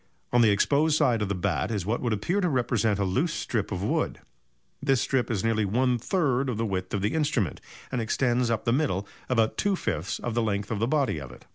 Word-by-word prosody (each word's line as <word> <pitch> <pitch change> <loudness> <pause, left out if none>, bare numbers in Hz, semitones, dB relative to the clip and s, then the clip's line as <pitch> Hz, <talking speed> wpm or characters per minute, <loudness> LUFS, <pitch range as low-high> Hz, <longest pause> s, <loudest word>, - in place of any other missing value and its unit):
On 120 - +5
the 115 - +6
exposed 145 +9 +3
side 125 -8 +2
of 105 - -1
the 100 - 0
bat 90 -1 -1
is 105 -6 -2
what 110 +4 -1
would 120 - -1
appear 140 - 0
to 180 - +2
represent 120 -6 +1
a 100 - 0
loose 135 - 0
strip 110 -4 -2
of 95 -1 -3
wood. - - 0 0.6
This 135 -2 +2
strip 130 0 0
is 105 -5 -1
nearly 115 -1 +1
one 125 +5 +1
third 135 - +1
of 120 - -2
the 115 - 0
width 95 -2 -2
of 100 - -2
the 105 - +1
instrument, 145 - 0 0.3
and 125 - -1
extends 120 +1 +1
up 115 -1 -1
the 115 - +2
middle 125 - 0 0.2
about 115 -3 +2
two 200 -1 +1
fifths 90 - -2
of 120 - -4
the 120 - +1
length 100 -1 -1
of 110 - -1
the 115 - +1
body 140 - +1
of 70 -3 -8
it. 65 - -14
115 Hz, 240 wpm, -27 LUFS, 100-130 Hz, 0.6 s, the